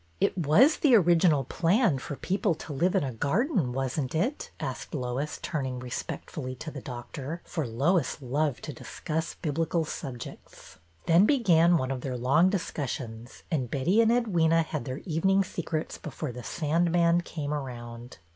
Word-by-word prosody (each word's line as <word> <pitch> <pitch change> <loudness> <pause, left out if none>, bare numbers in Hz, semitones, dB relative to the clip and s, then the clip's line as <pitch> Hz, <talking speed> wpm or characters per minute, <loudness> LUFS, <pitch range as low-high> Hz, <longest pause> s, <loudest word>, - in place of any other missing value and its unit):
'' 85 - -36
It - - -21
was 190 - +5
the 270 -6 +5
original 170 -6 +4
plan 175 - +2
for 145 - -6
people 190 +3 0
to 150 - -8
live 175 +7 +1
in - - +3
a 130 -3 -3
garden, 175 - +1
was 135 +2 -2
n't 130 +1 -3
it? 240 - -1
" - - -33
asked - - -5
Lois, 130 +2 -2
turning 130 -5 -2
respectfully 130 +2 -5
to 155 +5 -7
the 140 - -7
doctor, 130 +6 -6
for 160 -7 -3
Lois 140 +7 +1
loved 145 +1 -1
to 150 - -5
dis - - -10
cuss 160 0 -2
Biblical 165 +1 -1
subjects. 130 -5 -8 0.3
They 170 0 +5
began 180 - +5
one 130 -3 -2
of 130 -2 -3
their 130 -2 -3
long 140 +9 +4
discussions, 130 - -4
and 130 -7 0
Betty 175 - +3
and 225 - +4
Edwyna 170 -9 +3
had 155 -6 -4
their 130 +2 -5
evening 190 +3 +2
secrets 165 -3 -4
before 150 -2 -5
the 125 +1 -8
sandman 170 +4 +2
came 150 -4 -4
around. 120 -4 -6
155 Hz, 170 wpm, -28 LUFS, 130-175 Hz, 0.3 s, was